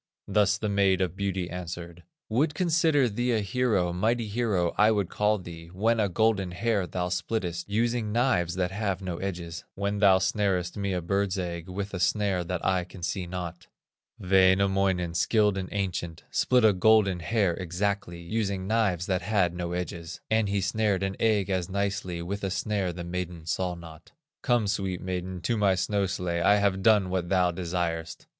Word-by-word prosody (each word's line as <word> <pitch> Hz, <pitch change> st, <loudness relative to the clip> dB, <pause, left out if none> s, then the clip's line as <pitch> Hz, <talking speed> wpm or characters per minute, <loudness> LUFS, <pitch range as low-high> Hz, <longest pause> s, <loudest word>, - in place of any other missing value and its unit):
Thus 100 Hz, -2 st, +3 dB
the 105 Hz, -, -3 dB
Maid 100 Hz, -2 st, +2 dB
of 90 Hz, -2 st, -1 dB
Beauty 95 Hz, -2 st, -2 dB
answered: 85 Hz, -1 st, -7 dB, 0.3 s
"Would 145 Hz, +7 st, +1 dB
consider 160 Hz, -6 st, +3 dB
thee 120 Hz, +3 st, -1 dB
a 110 Hz, -, +2 dB
hero, 100 Hz, -4 st, +1 dB
Mighty 110 Hz, +5 st, 0 dB
hero, 105 Hz, -6 st, 0 dB
I 105 Hz, +1 st, +5 dB
would 100 Hz, -5 st, +1 dB
call 105 Hz, +1 st, +1 dB
thee, 85 Hz, -3 st, -10 dB
When 110 Hz, +6 st, 0 dB
a 105 Hz, -2 st, +2 dB
golden 100 Hz, -1 st, +1 dB
hair 100 Hz, -1 st, 0 dB
thou 90 Hz, +1 st, -2 dB
splittest, 90 Hz, 0 st, -3 dB
Using 115 Hz, +1 st, 0 dB
knives 105 Hz, -8 st, +1 dB
that 90 Hz, 0 st, -1 dB
have 100 Hz, -2 st, -2 dB
no 90 Hz, -2 st, -3 dB
edges; 85 Hz, -3 st, -5 dB
When 100 Hz, +1 st, -2 dB
thou 100 Hz, -2 st, +6 dB
snarest 95 Hz, -2 st, 0 dB
me 100 Hz, -1 st, -2 dB
a 90 Hz, -2 st, -2 dB
bird's 100 Hz, +2 st, 0 dB
egg 85 Hz, -1 st, -4 dB
With 100 Hz, +2 st, -5 dB
a 95 Hz, -, -3 dB
snare 95 Hz, 0 st, +1 dB
that 90 Hz, 0 st, -3 dB
I 95 Hz, -1 st, +2 dB
can 90 Hz, 0 st, -12 dB
see 90 Hz, 0 st, -2 dB
not." 90 Hz, -1 st, -6 dB, 0.5 s
Wainamoinen, 95 Hz, -1 st, +3 dB
skilled 105 Hz, +3 st, +2 dB
and 95 Hz, -1 st, -4 dB
ancient, 90 Hz, -4 st, -3 dB
Split 125 Hz, -3 st, +3 dB
a 105 Hz, -, +6 dB
golden 100 Hz, -1 st, +4 dB
hair 90 Hz, +2 st, +1 dB
exactly, 95 Hz, 0 st, -2 dB
Using 100 Hz, 0 st, -2 dB
knives 100 Hz, -5 st, +1 dB
that 95 Hz, -2 st, 0 dB
had 95 Hz, -5 st, +1 dB
no 90 Hz, 0 st, -4 dB
edges; 85 Hz, -1 st, -5 dB
And 110 Hz, -2 st, +2 dB
he 100 Hz, 0 st, 0 dB
snared 100 Hz, 0 st, 0 dB
an 95 Hz, 0 st, -2 dB
egg 105 Hz, -3 st, +2 dB
as 90 Hz, -1 st, -1 dB
nicely 95 Hz, -3 st, -2 dB
With 100 Hz, +4 st, -4 dB
a 95 Hz, -, 0 dB
snare 95 Hz, 0 st, -1 dB
the 85 Hz, 0 st, -6 dB
maiden 85 Hz, -2 st, -5 dB
saw 90 Hz, +3 st, -1 dB
not. 85 Hz, -1 st, -13 dB, 0.3 s
"Come, 120 Hz, -4 st, +2 dB
sweet 95 Hz, -2 st, -1 dB
maiden, 90 Hz, -1 st, -4 dB
to 115 Hz, +3 st, 0 dB
my 100 Hz, -3 st, +3 dB
snow 100 Hz, +1 st, 0 dB
sledge, 85 Hz, -2 st, -2 dB
I 100 Hz, -, +5 dB
have 100 Hz, -2 st, +1 dB
done 100 Hz, -3 st, +4 dB
what 90 Hz, -2 st, -1 dB
thou 90 Hz, -2 st, +3 dB
desirest." 85 Hz, -2 st, -3 dB
95 Hz, 180 wpm, -27 LUFS, 90-105 Hz, 0.5 s, thou